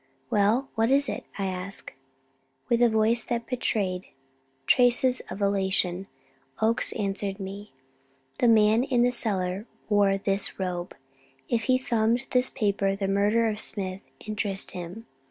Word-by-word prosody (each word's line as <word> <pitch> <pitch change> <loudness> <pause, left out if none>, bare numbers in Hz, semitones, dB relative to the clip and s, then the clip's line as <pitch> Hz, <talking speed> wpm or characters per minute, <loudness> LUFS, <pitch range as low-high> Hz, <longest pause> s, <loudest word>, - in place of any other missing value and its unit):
"Well, 215 +6 +2
what 225 +1 +1
is 280 +1 +3
it?" - - -4
I 195 - -2
asked. 185 +1 -4 0.8
With 235 0 +2
a 240 - +6
voice 220 +1 +3
that 235 -2 -2
betrayed 200 -7 -1 0.6
traces 250 - +4
of 200 - -4
elation, 190 -2 +1 0.5
Oakes 225 +2 +2
answered 200 -1 -3
me: 200 +2 -7 0.7
"The 245 - +3
man 220 +1 +5
in 250 -3 +2
the 245 - +3
cellar 195 -3 -1 0.2
wore 200 -2 +3
this 195 0 0
robe; 180 -2 -4 0.5
if 230 -1 0
he 255 -1 +3
thumbed 235 0 0
this 250 0 +3
paper, 200 -2 0
the 195 0 -2
murder 205 +4 +2
of 215 -1 -2
Smith 190 -3 -2 0.2
interested 210 -2 -1
him. 180 +6 -8
210 Hz, 140 wpm, -26 LUFS, 195-235 Hz, 0.8 s, a